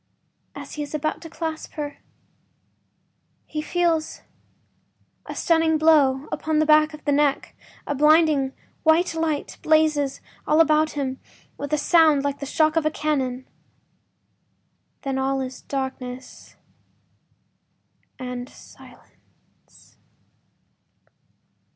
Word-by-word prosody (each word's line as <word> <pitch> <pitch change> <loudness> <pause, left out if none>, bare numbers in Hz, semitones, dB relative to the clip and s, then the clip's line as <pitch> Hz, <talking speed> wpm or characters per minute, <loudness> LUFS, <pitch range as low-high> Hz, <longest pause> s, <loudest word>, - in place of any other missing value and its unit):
As - - -9
he 300 - -5
is 295 +1 -5
about 310 +1 -2
to 330 - -9
clasp 320 -1 -5
her 295 -1 -6 1.5
he 305 - -4
feels 335 -1 -1 1.1
a - - -6
stunning 325 -1 +2
blow 295 -3 +3
upon 315 0 -1
the 310 - +3
back 305 0 +4
of 300 - -17
the 290 - +1
neck; 285 -1 +1 0.3
a - - -2
blinding 300 -2 +4 0.3
white 330 +2 +3
light 320 -3 -2
blazes 310 -3 +2 0.3
all 305 - +3
about 310 -1 +3
him 265 -2 -3 0.4
with 285 0 -6
a 305 - +2
sound 310 -2 +4
like 285 0 -2
the 280 - -5
shock 310 +2 +2
of 325 - +2
a - - +3
cannon—then 265 -5 -2 1.7
all 270 0 0
is 260 -1 -6
darkness 260 -2 -6 1.6
and 250 -1 -6
silence! - - -20
300 Hz, 110 wpm, -23 LUFS, 275-315 Hz, 1.7 s, back